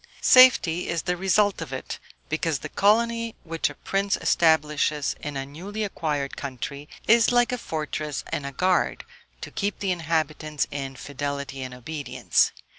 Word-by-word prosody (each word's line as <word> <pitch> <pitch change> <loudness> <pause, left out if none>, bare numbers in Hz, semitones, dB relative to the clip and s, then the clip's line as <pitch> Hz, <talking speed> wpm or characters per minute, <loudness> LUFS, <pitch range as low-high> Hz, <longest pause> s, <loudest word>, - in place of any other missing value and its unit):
Safety 235 -10 +6
is 170 -2 -1
the 180 - 0
result 195 +2 +2
of - - -6
it; - - -5 0.3
because 155 -1 0
the - - -7
colony 230 +2 +2
which 165 -2 -1
a - - -10
prince 195 0 -1
establishes 150 -2 +2
in 145 -1 -5
a 135 - -3
newly 190 +10 -6
acquired 150 -8 -2
country, 140 +2 -6 0.2
is 230 +1 +5
like 245 0 +3
a - - 0
fortress 155 -4 -4
and - - -1
a 140 - -4
guard, 180 +7 +1 0.4
to - - -7
keep 205 0 -2
the 195 -2 -1
inhabitants 155 -3 -1
in 135 -1 -5
fidelity 140 0 -5
and 130 -1 -6
obedience. 130 -2 0
160 Hz, 155 wpm, -25 LUFS, 140-195 Hz, 0.4 s, Safety